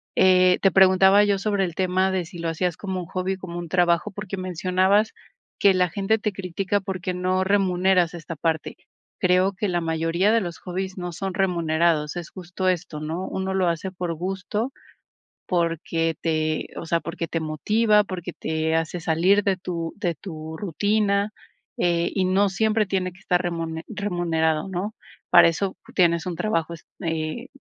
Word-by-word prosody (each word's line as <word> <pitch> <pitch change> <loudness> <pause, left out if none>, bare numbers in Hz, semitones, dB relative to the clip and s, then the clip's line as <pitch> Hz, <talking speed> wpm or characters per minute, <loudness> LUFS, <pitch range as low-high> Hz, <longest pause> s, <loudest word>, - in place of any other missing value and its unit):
Eh, 185 -1 +5
te 195 - +4
preguntaba 190 +2 +6
yo 200 -1 +2
sobre 200 -1 +1
el 170 -3 -6
tema 185 +1 +1
de 185 -2 0
si 170 +2 -11
lo 165 0 -2
hacías 170 +1 -1
como 190 -2 -4
un 175 - -7
hobby, 185 +1 -2
como 175 -2 -7
un 170 - -6
trabajo, 175 +2 +2
porque 200 -1 -6
mencionabas 185 +3 +1 0.5
que 200 -1 +6
la 180 -1 +2
gente 200 +5 0
te 210 0 -1
critica, 195 +2 -2
porque 185 -1 -4
no 185 +1 0
remuneras 185 -2 +2
esta 165 0 -7
parte. 160 +1 -2 0.4
Creo 185 +2 +3
que 205 +2 -2
la 175 -1 0
mayoría 165 +5 +1
de 230 - +3
los 175 -2 -5
hobbies 190 +1 -5
no 175 -1 -4
son 190 +2 -4
remunerados, 170 -4 +1
es 170 - -6
justo 185 0 -3
esto, 170 -4 -2
¿no? 165 +5 -4
Uno 190 0 -3
lo 185 -2 +2
hace 170 +3 -3
por 180 -2 -3
gusto, 195 - -3 0.8
porque 165 -2 0
te 155 -1 -1
o - - -5
sea, 165 +1 +1
porque 165 0 -4
te 165 - -2
motiva, 210 +8 +2
porque 180 -2 -6
te 160 0 -1
hace 165 +2 -1
salir 180 +5 +3
de 195 -2 +2
tu 170 -3 -4
de 175 -5 -1
tu 160 -2 -8
rutina, 205 +3 +1 0.5
eh, 170 -1 +1
y 190 -2 +2
no 195 +2 +3
siempre 220 +2 +1
tiene 185 -2 -1
que 190 - -19
estar 180 -2 +1
remune 165 -2 -3
remunerado, 175 -6 -1
¿no? 190 +4 -3 0.4
Para 175 -1 +8
eso 190 +3 -2 0.2
tienes 170 -2 +3
un 175 - -3
trabajo, 170 -3 -1 0.3
eh 165 - -3
180 Hz, 175 wpm, -24 LUFS, 165-195 Hz, 0.8 s, Para